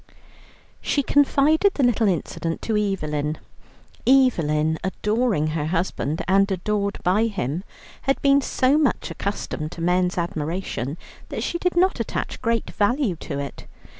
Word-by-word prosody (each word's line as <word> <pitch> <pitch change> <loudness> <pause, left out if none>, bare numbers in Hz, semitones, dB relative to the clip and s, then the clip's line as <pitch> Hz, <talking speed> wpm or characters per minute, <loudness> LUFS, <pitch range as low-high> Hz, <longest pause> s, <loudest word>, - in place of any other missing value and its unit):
She 285 - 0
confided 290 +7 +3
the 280 - +1
little 235 -3 +3
incident 165 -2 -2
to 220 - -1
Evelyn. 155 -7 -1 0.7
Evelyn, 160 - +3
adoring 210 -2 0
her 155 -1 -2
husband 165 -3 -1
and 195 +2 +3
adored 200 +2 -1
by 200 +5 +3
him, 180 - -3 0.5
had 275 - +2
been 280 0 +5
so 270 +2 +2
much 290 -5 0
accustomed 170 -5 -4
to 170 - -8
men's 180 +1 +1
admiration 165 -4 -3 0.3
that - - -4
she 345 - -2
did 360 0 0
not 370 -5 +3
attach 230 - -3
great 230 -1 0
value 230 - +1
to 140 - -5
it. 140 0 -6
195 Hz, 135 wpm, -23 LUFS, 165-250 Hz, 0.7 s, been